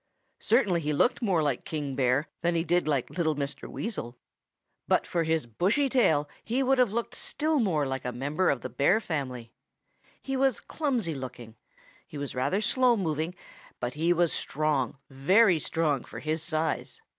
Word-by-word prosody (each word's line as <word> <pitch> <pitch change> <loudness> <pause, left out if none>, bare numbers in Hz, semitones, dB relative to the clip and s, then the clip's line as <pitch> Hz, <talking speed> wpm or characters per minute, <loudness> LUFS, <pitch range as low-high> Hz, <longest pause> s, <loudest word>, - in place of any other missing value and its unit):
Certainly 205 -8 +2
he 150 0 -1
looked 245 - +2
more 185 -8 +2
like 140 -4 -1
King 145 -4 -4
Bear 135 +3 +2
than 170 0 +1
he 165 - +1
did 175 0 +1
like 140 -5 0
little 160 -3 0
Mr. 140 -1 -4
Weasel. 125 - -5 0.7
But - - +2
for 170 -1 -1
his 160 -3 +1
bushy 195 - +1
tail 160 - +3 0.2
he 255 +4 0
would 265 0 +2
have 245 -5 +4
looked 235 +2 -2
still 315 -6 0
more 170 - +1
like 135 -1 -3
a 125 - -2
member 145 +9 0
of 135 - 0
the 130 - -5
Bear 140 - +3
family. 130 - -4 0.7
He 270 - -4
was 265 -2 +2
clumsy 250 - -1
looking. 125 -4 -8 0.5
He 150 - -9
was 140 -1 -4
rather 140 +11 0
slow 250 +1 +3
moving, 160 -1 -2 0.4
but 120 - -3
he 165 +3 +1
was 175 -1 +2
strong, 145 -3 -1
very 180 +7 +4
strong 150 -5 0
for - - -10
his 155 +1 -2
size. 160 -1 -2
160 Hz, 175 wpm, -28 LUFS, 140-210 Hz, 0.7 s, have